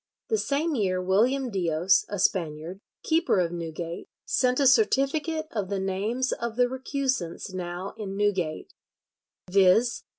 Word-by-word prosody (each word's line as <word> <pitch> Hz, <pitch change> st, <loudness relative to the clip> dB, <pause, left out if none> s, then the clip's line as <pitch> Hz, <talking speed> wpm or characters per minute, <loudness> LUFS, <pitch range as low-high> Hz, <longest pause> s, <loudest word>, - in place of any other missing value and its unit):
The 440 Hz, -, +1 dB
same 305 Hz, +1 st, 0 dB
year 190 Hz, -7 st, 0 dB
William 235 Hz, +8 st, +1 dB
Dios 175 Hz, -1 st, +2 dB
(a 205 Hz, -, -3 dB
Spaniard), 170 Hz, -2 st, -1 dB, 0.2 s
keeper 325 Hz, -, +2 dB
of 170 Hz, -2 st, 0 dB
Newgate, 170 Hz, 0 st, -6 dB, 0.2 s
sent 255 Hz, 0 st, +1 dB
a 280 Hz, -, +3 dB
certificate 310 Hz, -, +2 dB
of 205 Hz, -4 st, -3 dB
the 200 Hz, -1 st, -1 dB
names 205 Hz, +7 st, -1 dB
of 235 Hz, -1 st, -3 dB
the 245 Hz, 0 st, +3 dB
recusants 260 Hz, -, -3 dB
now 180 Hz, +1 st, -5 dB
in 195 Hz, -2 st, -5 dB
Newgate, 195 Hz, -, -1 dB, 0.8 s
"viz. 200 Hz, +5 st, +4 dB
205 Hz, 135 wpm, -26 LUFS, 180-260 Hz, 0.8 s, viz